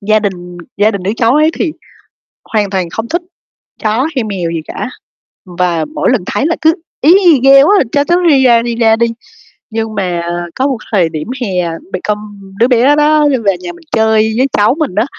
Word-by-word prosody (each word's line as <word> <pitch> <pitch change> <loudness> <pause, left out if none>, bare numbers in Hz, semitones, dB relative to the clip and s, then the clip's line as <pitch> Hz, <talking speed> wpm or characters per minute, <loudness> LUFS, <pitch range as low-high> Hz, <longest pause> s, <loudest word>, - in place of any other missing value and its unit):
gia 215 +1 +2
đình 180 -4 -5 0.2
gia 210 +2 +3
đình 200 -4 -5
đứa 195 - -1
cháu 230 +2 +2
ấy 310 +1 +3
thì 325 - -1 0.8
hoàn 210 -2 +1
toàn 185 -3 -2
không 225 +6 -5
thích 345 +7 -2 0.6
chó 225 +6 +1
hay 255 - 0
mèo 185 -6 -3
gì 165 -1 -3
cả, - - -5 0.7
và 170 -3 +1
mỗi - - +1
lần - - +1
thấy 280 - -1
là 335 - 0
cứ: 320 +1 +3 0.3
"Í 320 +5 +6
i, 320 -7 +5
ghê 275 0 +7
quá! 355 - +4 0.2
Cho 285 0 +2
chó 345 +3 +2
đi 270 -2 +4
ra, 235 -2 +4
đi 235 0 -3
ra 225 -1 +3
đi." 235 +1 +2 0.7
Nhưng 220 -1 -3
mà 180 -3 -2 0.3
có 265 +2 0
một 265 -4 -2
thời 180 -6 +2
điểm 155 +3 -6
hè 180 -6 -1 0.2
bị 185 - -2
câm 210 0 -1 0.4
đứa 235 - +4
bé 255 +4 +3
đó 300 0 +3
đi 270 - +1
về 200 -6 0
nhà 175 -1 -6
mình 320 - -17
chơi 220 0 +2
với 260 +2 +2
cháu 210 +5 +2
mình 290 -12 -2
á, 215 +3 +2
225 Hz, 215 wpm, -13 LUFS, 195-270 Hz, 0.8 s, ghê